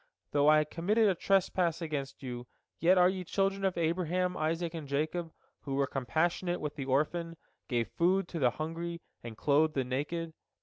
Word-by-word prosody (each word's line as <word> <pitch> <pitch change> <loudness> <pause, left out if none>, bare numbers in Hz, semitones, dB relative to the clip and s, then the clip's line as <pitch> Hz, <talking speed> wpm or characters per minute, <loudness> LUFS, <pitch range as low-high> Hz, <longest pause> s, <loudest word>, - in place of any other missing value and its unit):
Though 145 +1 +4
I 155 0 +6
committed 200 +8 +1
a 195 - +4
trespass 180 -2 +1
against 145 -5 -4
you, 125 -1 -6 0.3
yet 180 +3 +5
are 180 0 +7
ye 185 0 -1
children 195 +2 0
of 190 -2 +1
Abraham, 180 +2 0
Isaac, 165 +2 -1
and 160 -4 -6
Jacob, 155 +4 -1 0.3
who 135 -1 -4
were 140 0 +2
compassionate 170 +7 0
with 150 -1 -4
the 140 -3 -4
orphan, 165 +5 0 0.3
gave 120 -3 0
food 185 +2 +1
to 170 - -4
the 125 -4 +4
hungry, 165 +5 -5 0.2
and 115 -2 -8
clothed 150 +3 +3
the 135 - +1
naked. 150 +6 -3
165 Hz, 175 wpm, -31 LUFS, 145-175 Hz, 0.3 s, are